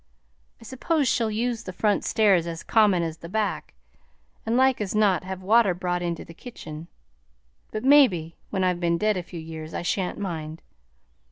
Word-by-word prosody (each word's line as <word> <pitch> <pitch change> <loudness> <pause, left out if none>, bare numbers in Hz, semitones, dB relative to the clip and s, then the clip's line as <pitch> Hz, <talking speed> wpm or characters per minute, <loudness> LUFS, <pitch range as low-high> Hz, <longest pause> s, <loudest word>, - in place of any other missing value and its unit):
I - - -15
s'pose 270 +5 -1
she'll 230 -2 +1
use 230 +1 -2
the 185 - -7
front 205 +2 0
stairs 195 -6 +3
as 165 -1 -6
common 205 -6 +3
as 165 -1 -4
the 170 +1 -10
back 215 +2 -2 0.7
and 230 +2 +1
like 260 -2 +3
as 205 0 -3
not 205 -4 +3
have 190 0 -6
water 210 -2 +4
brought 175 0 -2
into 170 -1 -3
the 165 - -12
kitchen, 165 -6 -10 0.8
but 215 - -4
mebbe 255 - +5 0.2
when 190 -2 -1
I've 180 -1 +1
been 170 -1 +1
dead 215 +3 +1
a 180 - -2
few 175 0 -9
years 160 0 -8
I - - -3
shan't 180 +1 -1
mind. 160 -5 -5
190 Hz, 180 wpm, -25 LUFS, 170-220 Hz, 0.8 s, mebbe